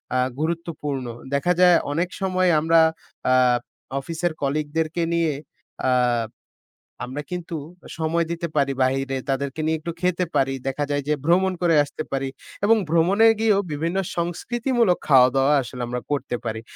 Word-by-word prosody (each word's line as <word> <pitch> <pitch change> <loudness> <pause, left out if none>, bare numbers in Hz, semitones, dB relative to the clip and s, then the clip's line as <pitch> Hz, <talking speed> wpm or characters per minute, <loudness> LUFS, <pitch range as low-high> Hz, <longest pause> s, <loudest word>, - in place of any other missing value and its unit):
আ - - +3 0.2
গুরুত্বপূর্ণ। 155 -4 -3 0.3
দেখা 140 +6 +2
যায় 180 -1 +7 0.2
অনেক 170 +4 0
সময় 185 -1 +2
আমরা 165 +2 +4 0.5
আ - - +5 0.7
অফিসের 165 +4 -2
কলিগদেরকে 155 +3 -1
নিয়ে 165 -2 +2 0.6
আ - - +3 1.2
আমরা 130 +4 -5
কিন্তু 175 -2 -4 0.4
সময় 165 +1 0
দিতে 170 0 -3
পারি 140 -2 +2
বাহিরে 135 +1 0
তাদেরকে 135 +2 -2
নিয়ে 160 0 +1
একটু 170 +2 -5
খেতে 180 0 +1
পারি। 135 0 +2
দেখা 135 +2 -1
যায় 145 0 0
যে 150 - +2
ভ্রমণ 185 +3 +3
করে 170 -2 +3
আসতে 145 +2 -6
পারি। 135 0 -1 0.4
এবং 225 +2 +6
ভ্রমণে 175 +7 +4
গিয়েও 215 -3 +3
বিভিন্ন 165 +5 -2 0.2
সংস্কৃতিমূলক 225 +4 0
খাওয়া 130 -3 +7
দাওয়া 135 +2 +3
আসলে 125 0 -7
আমরা 125 +1 -3
করতে 140 -3 -1
পারি। 110 -1 -3
160 Hz, 145 wpm, -23 LUFS, 140-175 Hz, 1.2 s, যায়